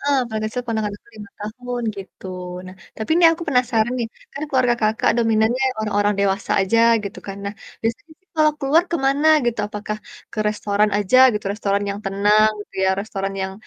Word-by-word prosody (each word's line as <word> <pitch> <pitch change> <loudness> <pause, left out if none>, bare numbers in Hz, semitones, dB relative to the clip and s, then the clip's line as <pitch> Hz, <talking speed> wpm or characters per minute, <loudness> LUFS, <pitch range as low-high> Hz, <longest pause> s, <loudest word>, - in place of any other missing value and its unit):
Heeh, 285 -1 +2
paling 220 -1 -3
kecil 245 +3 -4
ponakan 220 -3 -1
aku - - -28
5 210 -2 -10
tahun, 245 +3 -5
gitu. 195 0 -10 0.4
Nah, 185 - -10 0.2
tapi 220 - -6
ini 345 - +4
aku 330 +1 -5
penasaran 245 -3 +2
nih, 235 - -1 0.3
kan 280 - -6
keluarga 255 -3 +2
Kakak 215 +1 +2
dominannya 225 +2 +2 0.2
orang-orang 205 -1 +1
dewasa 200 0 0
aja, 195 +4 +2 0.3
gitu 200 - -6
kan, 195 -1 -6
nah, 200 +1 -4 0.3
biasanya 235 +8 -3
sih 375 - -41
kalau 305 -1 +4
keluar 295 +4 +4
ke 340 - +2
mana 280 +3 +2 0.2
gitu, 235 -1 0
apakah 210 0 -5 0.4
ke - - -8
restoran 210 0 +1
aja 205 +4 +2 0.2
gitu, 210 -1 -4
restoran 200 -1 -1
yang 200 - -4
tenang 205 +2 +3
gitu 205 - -12
ya, - - +3
restoran 195 -2 -4
yang 190 0 -3
215 Hz, 190 wpm, -21 LUFS, 205-245 Hz, 0.4 s, ini